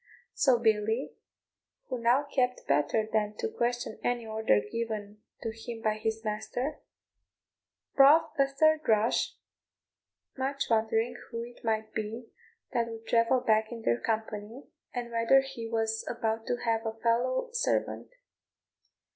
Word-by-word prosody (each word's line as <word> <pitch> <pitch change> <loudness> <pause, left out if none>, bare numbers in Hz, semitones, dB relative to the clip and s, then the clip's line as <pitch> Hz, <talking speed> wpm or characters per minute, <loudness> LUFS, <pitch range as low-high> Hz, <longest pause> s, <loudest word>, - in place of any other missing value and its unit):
So 260 -3 +4
Billy, 220 +1 +1 0.8
who 255 - -2
now 245 +5 +3
knew 255 -2 +5 0.2
better 150 +10 +2
than 210 -1 +1
to - - -1
question 240 - -2
any 240 -1 0
order 220 - +2
given 210 - -5 0.2
to 225 - -2
him 225 0 -8
by 215 0 +1
his 220 0 -2
master, 245 +7 -3 1.1
brought 285 +4 +6
a 275 - +5
third 310 +3 +3
rush, 220 +1 +2 1.0
much 275 0 -2
wondering 225 +2 +1
who 230 -1 -4
it 240 0 -12
might 220 -1 -1
be 225 +2 -5 0.4
that 235 -1 +1
would 225 0 -8
travel 235 +2 +3
back 220 0 +2
in 230 -1 -7
their 120 - +2
company, 220 +2 -3 0.3
and 240 -1 -4
whether 230 +4 +5
he 270 -4 -7
was 225 -1 -1
about 225 -2 -2
to - - +1
have 225 -1 +1
a 225 -1 -2
fellow 240 - +1
servant. 475 0 -1
230 Hz, 140 wpm, -29 LUFS, 220-245 Hz, 1.1 s, brought